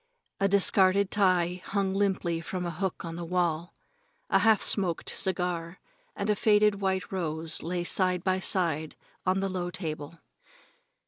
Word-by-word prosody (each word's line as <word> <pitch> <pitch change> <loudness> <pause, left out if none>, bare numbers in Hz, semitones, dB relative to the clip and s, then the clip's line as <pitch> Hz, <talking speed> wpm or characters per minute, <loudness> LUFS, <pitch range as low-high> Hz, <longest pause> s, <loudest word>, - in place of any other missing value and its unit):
A 195 - +3
discarded 195 0 +3
tie 180 -3 +2
hung 195 -1 -1
limply 190 -4 0
from 180 +1 -4
a 175 - -2
hook 185 +2 -4
on 165 0 -6
the 175 - -5
wall, 170 -1 -1 0.6
a - - +5
half 220 -2 +4
smoked 180 -5 +1
cigar 180 -2 -2 0.4
and 200 - -3
a 210 - +2
faded 210 -1 +3
white 190 -2 -1
rose 165 -3 -1
lay 175 +2 -2
side 180 0 +1
by 185 -1 +1
side 165 -5 0 0.3
on 190 +1 +2
the 195 - 0
low 180 -1 -3
table. 155 -3 -5
185 Hz, 150 wpm, -28 LUFS, 170-195 Hz, 0.6 s, a